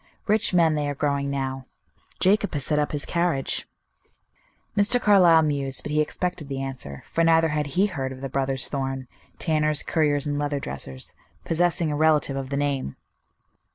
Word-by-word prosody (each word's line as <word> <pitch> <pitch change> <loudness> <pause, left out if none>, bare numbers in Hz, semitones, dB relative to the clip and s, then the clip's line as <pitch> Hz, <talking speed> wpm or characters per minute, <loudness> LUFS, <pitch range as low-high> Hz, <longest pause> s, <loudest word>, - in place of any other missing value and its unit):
Rich 215 0 +2
men 170 -3 +4
they 150 -1 -1
are 145 - -3
growing 140 0 -1
now. 135 -1 -3 0.5
Jacob 200 +3 +3
has 145 -3 0
set 150 -1 +2
up 150 - 0
his 145 -1 -3
carriage." 170 -6 0 1.1
Mr. 215 +4 +3
Carlyle 180 -7 +6
mused, 140 -3 -1
but 150 - -5
he 150 0 +2
expected 175 0 -3
the 135 -1 -3
answer, 130 - -6
for 165 - 0
neither 165 0 +4
had 150 -1 -1
he 195 - +5
heard 135 -10 -3
of 130 0 -9
the 135 - -3
brothers 135 -1 -1
Thorn, 135 -2 -3 0.3
tanners, 155 -2 +1
curriers, 150 -3 +1
and 145 -1 -1
leather 145 -1 -1
dressers, 65 - -7 0.3
possessing 170 -1 +1
a - - -1
relative 150 -2 +2
of 135 -1 -4
the 140 - -2
name. 140 - -1
145 Hz, 175 wpm, -24 LUFS, 135-165 Hz, 1.1 s, Carlyle